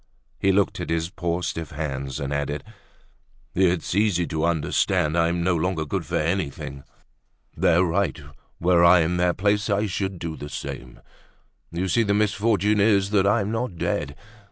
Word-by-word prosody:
He 95 - +3
looked 100 +1 +1
at - - -5
his 80 +1 -1
poor 85 0 -2
stiff 80 -1 -3
hands 70 -2 -4
and 70 -1 -3
added: 70 0 -2 0.9
"It's 90 -2 +1
easy 100 -3 +2
to 80 0 -1
understand, 80 -1 +1
I'm 85 +1 +1
no 90 0 +2
longer 85 -1 -1
good 70 - -3
for - - -3
anything. 75 -5 -2 0.7
They're 85 +2 +3
right; 90 +1 0 0.4
were 85 0 +4
I 85 0 +7
in 85 +2 0
their 90 0 +2
place 105 +2 +1
I 100 +1 +1
should 95 -1 -3
do 85 -2 -5
the 75 - -8
same. 60 -3 -7 0.7
You 90 +3 -2
see, 115 - +2
the 100 -2 +1
misfortune 105 0 +2
is 100 -1 +3
that 100 -2 +3
I'm 105 0 +1
not 115 -4 -2
dead. 70 -2 -2
90 Hz, 165 wpm, -24 LUFS, 80-100 Hz, 0.9 s, I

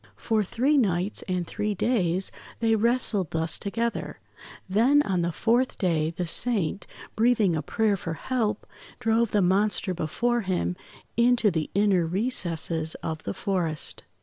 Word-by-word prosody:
For 220 -2 0
three 265 +9 +1
nights 190 -3 0
and 180 -2 -1
three 210 +4 -3
days, 190 -5 +1 0.3
they 225 -1 +2
wrestled 220 - +1
thus 160 0 +1
together, 230 +3 -3 0.5
then 245 +10 +4
on 185 -7 0
the 170 0 0
fourth 240 +8 +1
day 165 -5 +1
the 175 +2 -4
Saint, 200 0 +1 0.3
breathing 220 -6 +3
a 155 - -1
prayer 215 +7 0
for 165 -3 -5
help, 220 -1 -2 0.3
drove 230 -1 +2
the 205 -2 +2
monster 195 +1 +1
before 235 +9 -1
him 185 -2 -1 0.4
into 235 -3 +4
the 160 -3 -2
inner 195 -4 +3
recesses 170 -5 0
of 160 -1 -4
the 100 - -3
forest. 170 -6 -2
200 Hz, 145 wpm, -26 LUFS, 175-230 Hz, 0.5 s, then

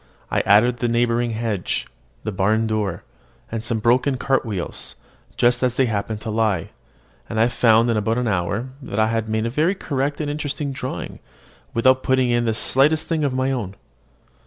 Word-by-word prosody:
I - - +2
added 115 +5 +5
the 120 - -1
neighbouring 120 0 +1
hedge, 110 -4 -2 0.4
the 110 - -2
barn 105 +4 +1
door, 110 -3 -2 0.5
and 110 -1 -3
some 115 0 0
broken 125 +4 +2
cart 135 +1 +1
wheels, 100 -6 -4 0.4
just 120 0 +3
as 125 -1 +1
they 135 - +3
happened 105 -1 -2
to 110 - -4
lie; 105 -6 0 0.6
and 110 - -2
I 115 - +5
found 115 -1 +4
in 115 -2 +1
about 110 +2 0
an 125 -1 0
hour 100 +5 -1
that 105 - -6
I 110 0 +3
had 115 -1 -1
made 110 +1 0
a 115 - -2
very 160 +9 +1
correct 145 -4 -2
and 150 - -2
interesting 145 -1 -3
drawing, 135 - -5 0.6
without 130 +3 +4
putting 130 -2 +2
in 120 0 +2
the 110 -1 0
slightest 145 +7 +3
thing 160 -2 0
of 140 - +1
my 130 +1 +1
own. 105 -7 -3
115 Hz, 185 wpm, -22 LUFS, 110-130 Hz, 0.6 s, added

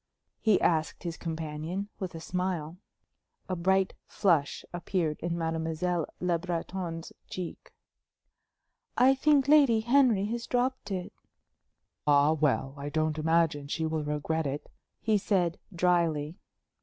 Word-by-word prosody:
he 215 -4 +4
asked 160 -2 +1
his 170 -2 -3
companion, 160 +4 -4
with 185 -3 -4
a - - -5
smile. 180 -1 -3 0.7
A 185 - -1
bright 190 +2 +2
flush 165 -7 +1
appeared 175 -3 -1
in 170 0 -2
Mademoiselle 165 +1 -1
Le 175 -2 +1
Breton's 170 -1 -4 0.2
cheek. 180 -2 -6 1.3
"I 260 +2 +6
think 280 0 +3
Lady 280 -7 +6
Henry 240 -4 +4
has 235 +2 -3
dropped 255 -2 0
it." 185 -2 -4 0.9
"Ah, 145 +1 +5
well, 145 -3 +1
I 145 +1 -4
don't 155 0 0
imagine 160 -2 +2
she 160 +2 -1
will 160 -1 -1
regret 150 +1 -1
it;" 140 +2 -5 0.3
he 215 -2 +2
said, 185 -4 +1
dryly. 170 -3 +1
170 Hz, 125 wpm, -29 LUFS, 155-190 Hz, 1.3 s, I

